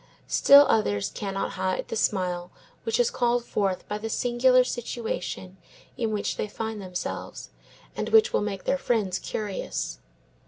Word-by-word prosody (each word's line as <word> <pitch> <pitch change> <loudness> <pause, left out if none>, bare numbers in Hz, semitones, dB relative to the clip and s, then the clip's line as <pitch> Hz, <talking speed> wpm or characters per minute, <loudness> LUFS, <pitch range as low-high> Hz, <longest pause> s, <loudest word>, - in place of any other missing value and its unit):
Still 280 +1 +7
others 100 - +1
cannot 195 -1 -3
hide 185 0 -2
the - - -3
smile 180 -4 0 0.4
which 225 +1 0
is 240 - +3
called 240 -1 +1
forth 195 -5 -1
by 210 - -3
the 225 +1 -4
singular 250 +2 +4
situation 220 -6 -4 0.4
in 230 -3 -1
which 210 -1 -2
they - - -2
find 220 0 -5
themselves, 180 -2 -6 0.4
and - - -3
which 450 +2 +5
will - - +2
make 200 -2 -3
their 275 - 0
friends 210 -9 0
curious. 65 - -4
210 Hz, 150 wpm, -26 LUFS, 185-240 Hz, 0.4 s, Still